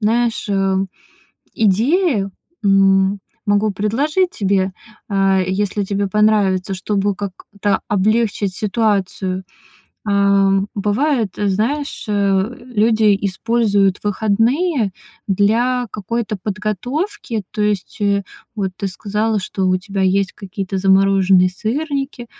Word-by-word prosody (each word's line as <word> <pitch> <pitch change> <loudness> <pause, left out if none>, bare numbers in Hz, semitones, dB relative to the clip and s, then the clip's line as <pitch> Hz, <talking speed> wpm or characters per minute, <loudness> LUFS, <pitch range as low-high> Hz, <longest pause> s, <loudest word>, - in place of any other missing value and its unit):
знаешь, 230 +2 +1
э, 195 -1 +1 0.8
идеи, 225 - +2 0.3
м, 195 0 +4 0.3
могу 205 +1 +2
предложить 285 - 0
тебе, 195 -2 0 0.4
э, 195 -2 +2
если 200 +1 -1
тебе 200 0 -1
понравится, 200 -2 +2
чтобы 200 +1 -1
как-то 200 0 -3
облегчить 210 -1 +1
ситуацию. 195 -3 -1 0.7
Э, 200 -1 +3
бывает, 215 - 0
знаешь, 225 +9 -1
э, 200 +2 +1
люди 220 -3 +3
используют 200 -1 +1
выходные 225 - +1 0.3
для 235 +6 +2
какой-то 215 +1 -3
подготовки. 225 - -3
То 215 - -4
есть, 210 -1 -1
э, 200 -1 +2 0.3
вот 195 -2 -1
ты 200 - -3
сказала, 210 +3 -1
что 190 0 -2
у 185 - +3
тебя 195 +1 -5
есть 190 0 +1
какие-то 195 0 -5
замороженные 190 -1 +4
сырники. 270 +5 -3
205 Hz, 100 wpm, -18 LUFS, 195-225 Hz, 0.8 s, м